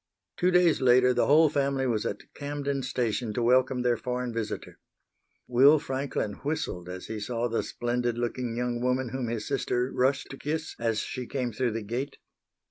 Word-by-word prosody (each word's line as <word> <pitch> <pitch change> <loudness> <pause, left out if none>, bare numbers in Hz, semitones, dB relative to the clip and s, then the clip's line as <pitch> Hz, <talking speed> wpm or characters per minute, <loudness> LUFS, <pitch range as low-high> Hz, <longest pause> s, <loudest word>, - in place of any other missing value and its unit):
Two 180 - +2
days 180 -4 +4
later 125 0 +5
the - - +2
whole 155 +3 +6
family 140 -2 0
was 115 -4 0
at 100 - -7
Camden 140 -1 -3
Station 125 -3 -1
to 120 - 0
welcome 125 +1 +3
their 120 -1 +2
foreign 125 -1 -3
visitor. 110 -2 -5 0.7
Will 135 +5 +6
Franklin 135 -6 -2
whistled 140 - -3
as 90 0 -6
he 110 -1 -5
saw 115 +3 -1
the 115 -1 0
splendid 120 0 -2
looking 120 0 -2
young 120 0 -1
woman 125 0 0
whom 130 0 -3
his 115 -2 -3
sister 125 +1 0
rushed 130 +2 +1
to 135 - -7
kiss 155 +3 -3
as 115 -2 0
she 125 -2 -5
came 125 -3 -2
through 120 0 0
the 115 -1 -3
gate. 125 +7 -4
125 Hz, 180 wpm, -28 LUFS, 120-135 Hz, 0.7 s, whole